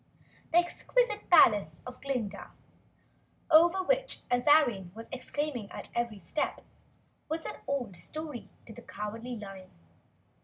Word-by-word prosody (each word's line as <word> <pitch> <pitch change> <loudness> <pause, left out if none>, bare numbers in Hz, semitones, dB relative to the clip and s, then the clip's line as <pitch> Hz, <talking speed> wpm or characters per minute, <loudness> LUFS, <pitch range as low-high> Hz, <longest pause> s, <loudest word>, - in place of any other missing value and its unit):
The 330 - +4
exquisite 425 +6 +1
palace 205 - +5
of 250 0 -9
Glinda, 250 -7 -4 1.0
over 345 +4 +6
which - - 0
Azarine 245 - +4
was 225 +1 -9
exclaiming 260 -4 -3
at - - -7
every 235 -3 -1
step, 195 - -2 0.7
was 320 +1 -3
an - - -5
old 250 -9 -2
story 300 - -6 0.2
to 225 - -11
the - - -11
Cowardly 225 +4 -6
Lion. 195 -3 -9
250 Hz, 120 wpm, -30 LUFS, 210-315 Hz, 1.0 s, over